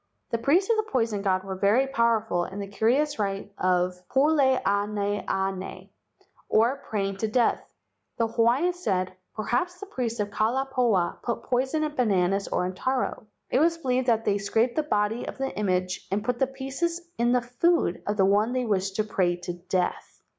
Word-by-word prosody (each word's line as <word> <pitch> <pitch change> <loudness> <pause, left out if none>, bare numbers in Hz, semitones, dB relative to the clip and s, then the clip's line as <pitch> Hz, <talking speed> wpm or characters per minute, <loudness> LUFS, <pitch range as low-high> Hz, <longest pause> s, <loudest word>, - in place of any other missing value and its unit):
The 230 - 0
priests 325 +11 +3
of 455 - +3
the 435 0 -2
poison 225 -5 0
god 190 -2 +1
were 195 0 -5
very 205 +7 +3
power¬ 230 -4 +1
ful 175 -4 0
in 190 - -8
the 200 - -3
curious 245 +8 +1
rite 200 0 -3
called 180 -1 +1 0.2
pule 290 +3 +4 0.2
ana 205 0 0
ana, 190 -1 -2 0.7
or 235 +5 +3
praying 195 -2 -1
to 220 - -1
death. 235 +2 +1 0.5
The 230 - +2
Hawaiians 245 +10 +2
said: 185 - -1 0.2
"Per¬ 215 - -3
haps 355 +9 0
the 405 - -7
priests 245 - -3
of 205 0 -1
Kalai 240 +6 0
pahoa 230 -9 +1
put 235 - -3
poison 265 +5 0
in 305 -1 -2
bananas 195 -4 +1
or 180 - 0
in 185 - -3
taro. 255 +1 -2 0.2
It 255 - +3
was 330 +2 +3
believed 255 -4 0
that 225 -2 +2
they 205 0 +2
scraped 225 +4 +1
the 310 - +2
body 215 -5 -1
of - - -6
the 270 0 -3
image 185 -3 -1
and 205 +1 -1
put 245 -1 -1
the 265 - +3
pieces 270 +6 -3 0.2
in 240 +1 +3
the 250 0 +3
food 245 - +1
of 205 0 -1
the 190 - +4
one 205 +5 +2
they 255 -1 0
wished 195 -3 0
to 215 - +1
pray 185 -4 +1
to 175 0 -6
death. 175 +1 -3
225 Hz, 195 wpm, -26 LUFS, 195-260 Hz, 0.7 s, pule